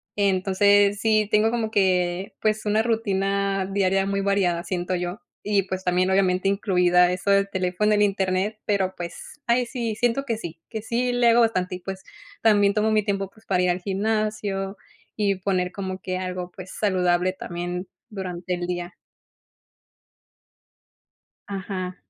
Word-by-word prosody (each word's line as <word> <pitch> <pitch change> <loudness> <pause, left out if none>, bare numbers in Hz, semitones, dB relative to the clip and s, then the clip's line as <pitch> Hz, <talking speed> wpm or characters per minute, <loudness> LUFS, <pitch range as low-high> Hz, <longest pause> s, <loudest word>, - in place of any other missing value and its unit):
Entonces, 200 +1 +3
sí 215 -2 +3
tengo 215 +1 +4
como 225 -2 -1
que, 185 -2 +1
pues, 215 0 0
una 215 +1 +2
rutina 200 -3 0
diaria 195 0 +1
muy 195 0 -1
variada, 190 -4 +1
siento 180 0 -2
yo, 180 +3 -3 0.2
y, 200 -2 +1
pues, 190 0 -5
también, 180 +1 +2
obviamente, 190 -1 +2
incluida 180 -3 +3
eso 190 +2 -1
del 200 0 +3
teléfono, 190 +3 +1
el 205 - +3
Internet, 195 +1 0
pero, 190 -2 0
pues, 175 +11 -8
ahí 240 +1 +3
sí, 235 -3 -3
siento 245 +4 +1
que 230 -5 -2
sí, 165 -5 -8
que 220 -2 -5
sí 245 +2 0
le 245 -1 +4
hago 235 +1 +5
bastante 185 -6 +1
y, - - -7
pues, 190 +1 -7 0.4
también 205 -2 +4
tomo 215 +1 +2
mi 215 -1 +3
tiempo, 195 -1 -1
pues, 220 0 -23
para 180 -2 +2
ir 180 - +3
al 180 +1 -3
gimnasio 205 -1 -1 0.4
y 200 -3 +1
poner 185 -2 0
como 190 -1 -4
que 185 0 -3
algo, 180 -1 -4
pues, 185 -1 -9
saludable 185 -2 +2
también 175 0 -5 0.2
durante 185 -2 -4
el 175 0 -3
día. 175 +1 -4 2.5
Ajá. 190 -2 -4
195 Hz, 155 wpm, -24 LUFS, 185-210 Hz, 2.5 s, hago